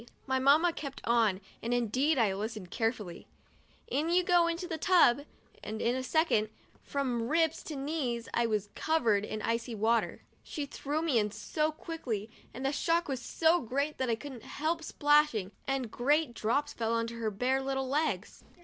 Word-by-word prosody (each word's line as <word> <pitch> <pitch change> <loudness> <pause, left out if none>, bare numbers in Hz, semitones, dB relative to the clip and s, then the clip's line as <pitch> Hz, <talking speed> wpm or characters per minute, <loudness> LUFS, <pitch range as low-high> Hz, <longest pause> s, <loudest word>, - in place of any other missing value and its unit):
my 265 0 +1
Mamma 305 +6 +5
kept 280 -4 -6
on, 225 -5 +2 0.2
and 235 +2 0
indeed 255 +6 +1
I 220 -5 +3
listened 210 -2 -5
carefully, 225 -6 -2 0.6
"in 300 +4 0
you 360 +1 +4
go 350 -1 +4
into 340 +2 -2
the 325 -3 -4
tub,'* 295 -6 +4 0.4
and 215 +1 -5
in 240 +2 +1
a 260 - -1
second, 255 -6 +2 0.3
from 250 -5 -2
ribs 325 0 +2
to 310 - -5
knees, 270 -5 -2
I 235 0 +2
was 210 -2 -1
covered 225 -11 +1
with 215 - -4
icy 230 +1 -1
water. 225 +2 +1 0.2
She 295 - -5
threw 290 +3 -3
me 285 -8 +3
in 210 -1 0
so 305 +9 -1
quickly 250 -10 -5 0.2
and 260 +2 -6
the 270 - +2
shock 335 +3 +1
was 265 -3 -3
so 330 +5 +2
great 280 +5 -2
that 260 -2 0
I 230 - +2
couldn't 260 0 -9
help 325 +6 -2
splashing, 295 -11 +2 0.2
and 270 -4 -1
great 290 +2 +1
drops 235 +6 0
fell 225 -1 -1
on 230 0 0
her 230 -1 -3
bare 250 +6 0
little 270 0 -2
legs. 300 +4 -1
260 Hz, 175 wpm, -31 LUFS, 230-305 Hz, 0.6 s, Mamma